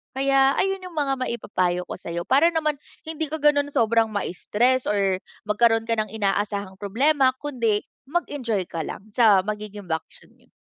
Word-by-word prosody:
Kaya 270 0 +3
ayun 385 0 -1
'yung 365 - -9
mga 280 -3 0
maipapayo 185 -7 -1
ko - - -4
sa'yo 170 0 -5
para 285 +5 +5
naman 305 -2 0 0.3
hindi 320 0 -2
ka 315 +2 -4
ganun 290 -1 +4
sobrang 225 -1 +2
ma-stress 230 +6 0
or 195 -2 +1 0.3
magkaroon 225 +1 +2
ka 230 - +1
ng 215 -2 -2
inaasahang 200 -2 -1
problema 260 +6 +2
kundi 235 -8 0 0.3
mag-enjoy 265 - -2
ka 165 -1 -3
lang - - -7
sa 210 -4 +5
magiging 210 -2 -6
bakasyon 160 0 -5
niyo. - - -30
225 Hz, 155 wpm, -24 LUFS, 205-280 Hz, 0.3 s, para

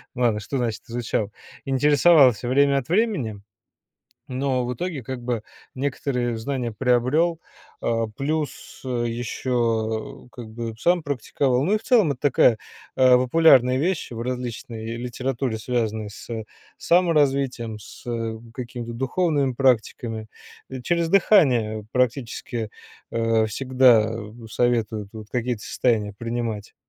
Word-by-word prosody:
Ладно, 120 -4 +1
что 135 +6 -4
значит 115 -3 -2
изучал? 115 -3 -2 0.3
Интересовался 135 -3 +4
время 140 +2 +3
от 130 - -9
времени, 175 - 0 0.9
но 130 -1 -1
в 125 - -2
итоге 150 -1 -4
как 130 +1 -6
бы 120 -2 -2 0.3
некоторые 125 -3 -2
знания 125 0 -3
приобрел. 135 +8 +2 0.4
А, 115 -1 0
плюс, 140 +6 -4
э, 120 -2 -1
еще 115 -2 -2
как 120 -3 -9
бы 115 0 -6
сам 175 +8 +2
практиковал, 135 -1 0
ну 190 - +1
и - - +3
в 215 - -15
целом, 215 - +4
это 125 - -6
такая, 125 -4 +4 0.4
а, 130 -1 +6
популярная 130 -1 +5
вещь 170 +2 -1
в 115 -1 -5
различной 120 -2 -5
литературе, 125 0 -3
связанной 110 -2 -2
с 100 - -12 0.5
саморазвитием, 140 -10 +1
с, 105 - -13
э, 115 -2 -3 0.2
каким-то 120 -2 -6
духовными 140 +2 0
практиками. 115 -3 0 0.4
И 130 -1 -6
через 170 +3 0
дыхание 125 - +3
практически, 120 -2 -1 0.4
э, 115 -1 +2
всегда, 125 -1 +4
э, 110 -2 -7 0.2
советуют 110 -4 0
вот 110 -1 -9
какие-то 120 -3 -2
состояния 105 -5 0
принимать. 115 -1 -4
125 Hz, 125 wpm, -23 LUFS, 115-135 Hz, 0.9 s, а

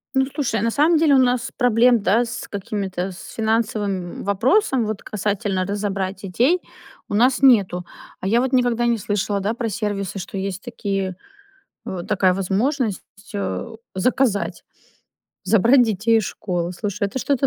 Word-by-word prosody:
Ну, 265 0 +4
слушай, 240 -8 -1
на 230 +1 +1
самом 310 +6 +4
деле, 310 -2 +4
у - - +6
нас 245 -1 0
проблем, 240 -1 +4
да, 225 +5 +3
с 240 +2 -6
какими-то, 195 -2 -4
с 180 - -11
финансовым 215 -5 -1
вопросом, 250 - +2
вот 215 -2 -4
касательно 200 -2 -1
разобрать 200 -1 -3
детей- 245 - +1 0.5
у - - -4
нас 250 +5 +3
нету. 200 -9 +4 0.3
А 190 - -4
я 230 +4 +3
вот 260 0 -1
никогда 245 -2 +2
не 235 -1 +2
слышала, 205 0 -1
да, 200 +3 -1
про 235 -1 -3
сервисы, 200 -2 -3
что 190 +2 -6
есть 190 0 -3
такие, 195 -6 -3 0.7
вот 180 -2 -5
такая 190 -3 +3
возможность, 210 +4 0 0.3
э, 95 - -3 0.2
заказать- 215 +1 0 0.8
забрать 235 +5 +5
детей 225 0 +2
из 220 - -1
школы. 175 -3 -3
Слушай, 200 +2 -2
это 260 - -4
что-то 275 0 +1
210 Hz, 155 wpm, -21 LUFS, 195-245 Hz, 0.8 s, у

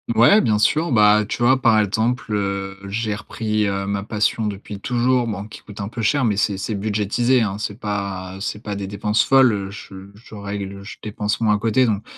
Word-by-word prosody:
Ouais, 120 - +6
bien 105 -2 +1
sûr. 155 +7 +2
Bah, 105 -1 +5
tu 120 - -3
vois, 130 +2 +4
par 115 -3 +4
exemple, 110 +2 0
heu, 100 -1 -2
j'ai 110 0 -2
repris, 105 0 -2
heu, 100 0 -2
ma 100 0 -2
passion 110 +1 0
depuis 100 0 -7
toujours, 125 -1 +1
bon, 100 -2 -4
qui 110 - -12
coûte 105 - -12
un 100 - -3
peu 115 +2 -6
cher. 130 +5 +2
Mais, 105 -3 +1
c'est 105 -1 0
c'est 100 +3 -3
budgétisé, 110 +5 +1
hein. 100 -2 -1
C'est 105 0 -5
pas 100 -3 -4
c'est 105 +1 -4
pas 105 -1 -5
des 100 -1 -4
dépenses 105 +2 +1
folles. 115 -8 +3
Je 95 -1 -10
je 110 +1 -14
règle, 100 -1 -6
je 105 - -9
dépense 105 -1 -3
moins 110 -2 +3
à - - 0
côté. 115 +4 +2
Donc, 105 -2 -1
105 Hz, 210 wpm, -21 LUFS, 100-115 Hz, -, Ouais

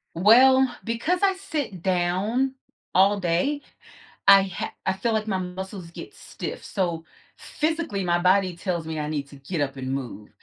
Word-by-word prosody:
Well, 260 +8 +6 0.2
because 240 - -1
I 390 - +4
sit 295 - -4
down 190 +9 0 0.4
all 200 +2 +4
day, 185 +12 0 0.7
I 195 0 +9
ha 190 -2 -5
I 190 - +1
feel 220 +4 -1
like 220 0 -1
my 195 -3 -1
muscles 185 -1 -6
get - - -10
stiff, - - -7
so 170 -5 -2 0.3
physically, 310 - -2
my 175 -1 +2
body 185 +1 +3
tells 170 -2 -3
me 160 -1 -4
I 150 - -3
need 145 -2 -3
to 140 - -12
get 145 +4 -5
up 135 -1 -3
and 130 0 -5
move. 120 -6 -5
190 Hz, 165 wpm, -25 LUFS, 170-230 Hz, 0.7 s, I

